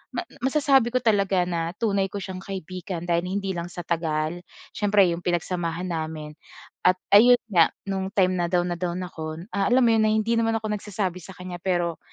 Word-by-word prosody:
ma -, -, -1 dB, 0.2 s
masasabi 270 Hz, -2 st, +3 dB
ko -, -, +5 dB
talaga 200 Hz, -4 st, +3 dB
na 170 Hz, -1 st, -2 dB
tunay 200 Hz, -4 st, +1 dB
ko -, -, -4 dB
siyang 185 Hz, -1 st, -6 dB
kaibigan 185 Hz, -2 st, -6 dB
dahil 170 Hz, 0 st, +1 dB
hindi 195 Hz, 0 st, -2 dB
lang 170 Hz, 0 st, -4 dB
sa 175 Hz, -, -6 dB
tagal, 160 Hz, 0 st, -1 dB, 0.3 s
siyempre 205 Hz, -1 st, +4 dB
'yong 170 Hz, +1 st, -3 dB
pinagsamahan 175 Hz, 0 st, -2 dB
namin 155 Hz, -2 st, -4 dB, 0.6 s
at 185 Hz, -, +5 dB, 0.2 s
ayun 240 Hz, +4 st, +8 dB
nga, 170 Hz, -4 st, +6 dB, 0.2 s
no'ng 190 Hz, -1 st, -2 dB
time 185 Hz, -2 st, +4 dB
na 175 Hz, -, +1 dB
down 175 Hz, -1 st, +2 dB
na -, -, -6 dB
down 175 Hz, 0 st, -2 dB
ako, 160 Hz, -1 st, -6 dB
ah 200 Hz, -1 st, +1 dB
alam 250 Hz, +1 st, +4 dB
mo -, -, +4 dB
'yon 220 Hz, -1 st, +3 dB
na -, -, +2 dB
hindi 220 Hz, +1 st, +1 dB
naman 225 Hz, 0 st, +1 dB
ako 215 Hz, -1 st, -4 dB
nagsasabi 195 Hz, -3 st, -3 dB
sa 190 Hz, +2 st, -11 dB
kanya 180 Hz, -1 st, -7 dB
pero 175 Hz, -3 st, -1 dB
185 Hz, 200 wpm, -25 LUFS, 170-205 Hz, 0.6 s, ayun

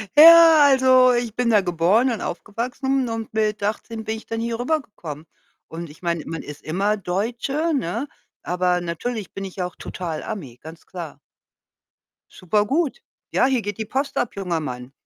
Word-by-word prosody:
Ja, 330 Hz, +1 st, +9 dB
also 260 Hz, -2 st, +5 dB
ich 240 Hz, -2 st, -2 dB
bin 245 Hz, -1 st, +1 dB
da 215 Hz, -3 st, +5 dB
geboren 185 Hz, +8 st, +2 dB
und 230 Hz, -, -3 dB
aufgewachsen 250 Hz, +7 st, -2 dB
und 225 Hz, -1 st, -5 dB
mit 215 Hz, -1 st, 0 dB
18 220 Hz, +2 st, -3 dB
bin 220 Hz, 0 st, -3 dB
ich 220 Hz, -, -12 dB
dann 225 Hz, -, -4 dB
hier 230 Hz, 0 st, -3 dB
rübergekommen 210 Hz, -, -3 dB, 0.4 s
und 165 Hz, 0 st, -7 dB
ich 150 Hz, -, -16 dB
meine, 170 Hz, -3 st, -1 dB
man 165 Hz, -1 st, -4 dB
ist 145 Hz, 0 st, -9 dB
immer 195 Hz, +6 st, 0 dB
Deutsche, 235 Hz, -, -2 dB
ne? 240 Hz, -, -2 dB, 0.4 s
Aber 180 Hz, 0 st, +1 dB
natürlich 195 Hz, +5 st, -4 dB
bin 195 Hz, -, -5 dB
ich 190 Hz, -, -10 dB
ja 180 Hz, -, -1 dB
auch 180 Hz, -, -14 dB
total 165 Hz, -4 st, -5 dB
Ami, 150 Hz, -, -7 dB
ganz 160 Hz, +1 st, -12 dB
klar. 165 Hz, -6 st, -8 dB, 1.1 s
Super 205 Hz, +4 st, 0 dB
gut. 320 Hz, -, -1 dB, 0.3 s
Ja, -, -, +3 dB
hier 260 Hz, -2 st, +2 dB
geht 205 Hz, -2 st, -5 dB
die 220 Hz, -, -3 dB
Post 275 Hz, +5 st, -2 dB
ab, 245 Hz, -, -1 dB
junger 180 Hz, -4 st, -2 dB
Mann. 125 Hz, -4 st, -6 dB
215 Hz, 175 wpm, -22 LUFS, 175-250 Hz, 1.1 s, Ja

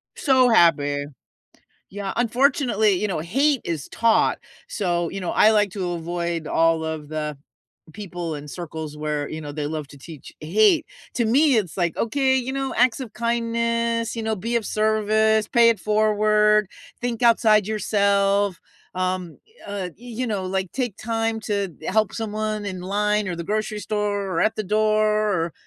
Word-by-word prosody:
So 260 Hz, -3 st, +3 dB
happy. 145 Hz, -8 st, +3 dB, 0.9 s
Yeah, 195 Hz, 0 st, -4 dB
unfortunately, 240 Hz, -3 st, +2 dB
you 200 Hz, +3 st, 0 dB
know, 185 Hz, -, -2 dB
hate 270 Hz, -, +1 dB
is 160 Hz, -5 st, -4 dB
taught. 230 Hz, -1 st, +2 dB, 0.3 s
So, 175 Hz, -5 st, -1 dB
you 195 Hz, -, -5 dB
know, 180 Hz, -, -3 dB
I 215 Hz, -, +5 dB
like 210 Hz, -2 st, +2 dB
to 185 Hz, -3 st, -3 dB
avoid 170 Hz, -1 st, -3 dB
all 165 Hz, +1 st, +2 dB
of 160 Hz, -2 st, -5 dB
the 150 Hz, -1 st, -4 dB, 0.6 s
people 175 Hz, -5 st, -5 dB
in 145 Hz, 0 st, -9 dB
circles 160 Hz, -2 st, -7 dB
where, 150 Hz, -1 st, -3 dB
you 155 Hz, -, -6 dB
know, 145 Hz, -1 st, -7 dB
they 145 Hz, 0 st, -3 dB
love 150 Hz, -1 st, -5 dB
to 140 Hz, -, -14 dB
teach 155 Hz, 0 st, -11 dB
hate. 215 Hz, -, +3 dB, 0.3 s
To 235 Hz, -, +1 dB
me, 270 Hz, +4 st, +4 dB
it's 190 Hz, -7 st, -1 dB
like, 175 Hz, -3 st, -1 dB
okay, 265 Hz, +3 st, +1 dB
you 260 Hz, 0 st, -2 dB
know, 270 Hz, 0 st, -2 dB
acts 250 Hz, +2 st, +3 dB
of 250 Hz, -5 st, -7 dB
kindness, 230 Hz, 0 st, -1 dB
you 230 Hz, -, -4 dB
know, 220 Hz, 0 st, -1 dB
be 230 Hz, +5 st, -3 dB
of 230 Hz, -, -1 dB
service, 215 Hz, 0 st, +2 dB
pay 235 Hz, -3 st, +5 dB
it 220 Hz, -4 st, -1 dB
forward, 210 Hz, 0 st, +3 dB, 0.3 s
think 240 Hz, -1 st, -3 dB
outside 220 Hz, -3 st, +4 dB
yourself, 200 Hz, -2 st, +1 dB, 0.3 s
um, 185 Hz, -2 st, -3 dB, 0.3 s
uh, 200 Hz, -3 st, -4 dB
you 245 Hz, +2 st, -5 dB
know, 200 Hz, -4 st, -2 dB
like, 190 Hz, -1 st, -2 dB
take 245 Hz, -6 st, -3 dB
time 225 Hz, 0 st, -2 dB
to 200 Hz, -5 st, -2 dB
help 215 Hz, 0 st, +1 dB
someone 215 Hz, -1 st, -3 dB
in 185 Hz, -3 st, -5 dB
line 210 Hz, +2 st, 0 dB
or 180 Hz, -, -2 dB
the 170 Hz, -, -4 dB
grocery 215 Hz, +2 st, -2 dB
store 210 Hz, -1 st, -1 dB
or 165 Hz, -, -1 dB
at 215 Hz, -, +2 dB
the 215 Hz, -, -1 dB
door 215 Hz, +2 st, +2 dB, 0.4 s
or, 170 Hz, -, -9 dB
210 Hz, 170 wpm, -23 LUFS, 175-225 Hz, 0.9 s, I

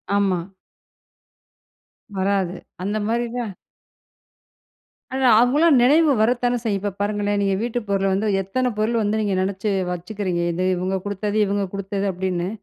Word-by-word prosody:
ஆமா. 195 Hz, -3 st, +2 dB, 1.8 s
வராது. 190 Hz, -2 st, 0 dB, 0.3 s
அந்த 205 Hz, +3 st, -1 dB
மாரி 235 Hz, +1 st, 0 dB
தான். 220 Hz, -6 st, -4 dB, 1.8 s
அவங்களா 280 Hz, +7 st, +4 dB
நினைவு 300 Hz, +5 st, +5 dB
வரத்தானே 245 Hz, +1 st, +2 dB
செய்யும், 205 Hz, -3 st, 0 dB
இப்ப 205 Hz, -2 st, -2 dB
பாருங்களேன் 205 Hz, 0 st, 0 dB
நீங்க 195 Hz, -1 st, +1 dB
வீட்டுப் 240 Hz, -1 st, -3 dB
பொருள 195 Hz, 0 st, +1 dB
வந்து 210 Hz, +3 st, 0 dB
எத்தன 250 Hz, +6 st, -1 dB
பொருள் 225 Hz, +2 st, +1 dB
வந்து 210 Hz, +1 st, 0 dB
நீங்க 200 Hz, -3 st, 0 dB
நினைச்சு 195 Hz, +2 st, -2 dB, 0.2 s
வச்சுக்கிறீங்க, 180 Hz, 0 st, -3 dB
இது 185 Hz, +2 st, -1 dB
இவங்க 185 Hz, +2 st, -1 dB
குடுத்தது, 205 Hz, +1 st, -2 dB
இவங்க 200 Hz, 0 st, 0 dB
குடுத்தது, 200 Hz, 0 st, -3 dB
அப்படின்னு. 180 Hz, -1 st, -2 dB
205 Hz, 130 wpm, -22 LUFS, 190-225 Hz, 1.8 s, நினைவு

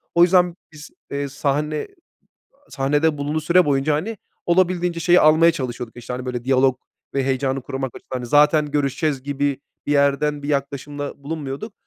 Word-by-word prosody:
O 170 Hz, -, +7 dB
yüzden 180 Hz, -1 st, +4 dB, 0.2 s
biz, 155 Hz, 0 st, -12 dB, 0.2 s
ııı, 140 Hz, 0 st, -2 dB
sahne 150 Hz, +2 st, -1 dB, 0.8 s
ı -, -, -26 dB
sahnede 145 Hz, +2 st, +1 dB
bulunduğu 150 Hz, +2 st, -1 dB
süre 175 Hz, +4 st, +4 dB
boyunca, 145 Hz, +1 st, +1 dB
hani, 205 Hz, +10 st, -3 dB, 0.3 s
olabildiğince 175 Hz, -1 st, +1 dB
şeyi 175 Hz, +2 st, +5 dB
almaya 160 Hz, +2 st, +6 dB
çalışıyorduk, 125 Hz, -5 st, -5 dB
işte, 120 Hz, 0 st, -7 dB
hani, 125 Hz, +1 st, -5 dB
böyle, 125 Hz, -1 st, -4 dB
diyalog 130 Hz, 0 st, +3 dB, 0.4 s
ve 135 Hz, -1 st, +1 dB
heyecanı 135 Hz, 0 st, -1 dB
korumak 135 Hz, -1 st, -4 dB
açısından. 130 Hz, -, -7 dB
Hani, 125 Hz, -, -6 dB
zaten 150 Hz, +3 st, +4 dB
görüşeceğiz 140 Hz, 0 st, -1 dB
gibi 140 Hz, 0 st, -1 dB, 0.3 s
bir 145 Hz, -, +1 dB
yerden 145 Hz, +1 st, +2 dB
bir 145 Hz, -, -5 dB
yaklaşımda 140 Hz, 0 st, -3 dB
bulunmuyorduk. 145 Hz, +5 st, -5 dB
145 Hz, 160 wpm, -21 LUFS, 135-155 Hz, 0.8 s, O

